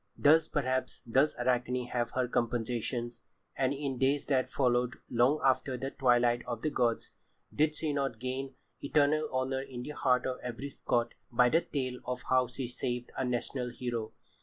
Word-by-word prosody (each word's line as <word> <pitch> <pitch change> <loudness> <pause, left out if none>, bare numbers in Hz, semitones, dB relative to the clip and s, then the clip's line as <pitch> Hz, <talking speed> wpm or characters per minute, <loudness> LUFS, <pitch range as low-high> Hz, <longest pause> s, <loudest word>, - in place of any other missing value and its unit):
Thus, 155 +2 +5
perhaps, 130 -2 -1
does 135 +6 +2
Arachne 125 0 0
have 120 -1 -1
her 130 -1 +1
compensations, 120 0 -2 0.3
and 130 -1 +1
in 140 -2 -3
days 135 +2 +2
that 130 -2 +1
followed 125 -2 +1 0.2
long 125 +5 +3
after 130 0 +2
the 135 +2 -4
twilight 120 -2 +3
of 120 -2 -4
the 155 - 0
gods, 120 -4 0 0.4
did 155 +1 +2
she 155 -1 -1
not 135 -4 -1
gain 130 +2 -4 0.3
eternal 150 +1 +2
honour 130 +1 0
in 125 -2 -7
the 150 - -5
heart 125 -4 +2
of 130 -1 -2
every 125 +3 -5
Scot 120 -2 0 0.2
by 125 +1 +5
the 165 +6 +4
tale 130 -5 -3
of 125 0 -4
how 130 -1 +4
she 125 +1 -5
saved 125 0 -4
a - - -1
national 125 0 -2
hero? 120 -2 -4
125 Hz, 170 wpm, -31 LUFS, 120-135 Hz, 0.4 s, Thus